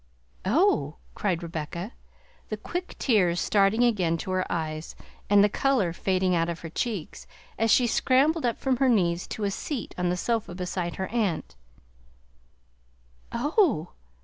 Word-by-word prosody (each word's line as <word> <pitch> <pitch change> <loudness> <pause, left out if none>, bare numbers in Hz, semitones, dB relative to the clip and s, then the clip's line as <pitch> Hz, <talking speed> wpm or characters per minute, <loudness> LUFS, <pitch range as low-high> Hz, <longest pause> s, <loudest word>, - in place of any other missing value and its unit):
"Oh 195 - +2
h!" - - -33
cried 180 -4 -1
Rebecca, 170 +4 -5 0.6
the 215 - -3
quick 355 - -5
tears 180 -9 +2
starting 205 +4 +3
again 185 -9 +2
to 185 - -3
her 185 0 -1
eyes 155 -1 -3 0.3
and 205 0 +6
the - - +6
color 210 -5 +1
fading 185 +1 +1
out 165 -1 +1
of 170 -1 -5
her 165 - -7
cheeks, 205 -5 -4 0.3
as 225 0 +2
she 245 +3 +5
scrambled 275 +7 +2
up 240 -2 0
from 265 -2 0
her 265 +1 +3
knees 175 -6 +2
to 215 - -5
a 200 - +1
seat 255 +4 -4
on 180 0 +1
the 180 - 0
sofa 220 -2 -1
beside 180 -1 -3
her 190 - -3
aunt. 210 -8 -1 1.8
"Oh 260 - +1
h! - - -33
195 Hz, 160 wpm, -26 LUFS, 175-240 Hz, 1.8 s, and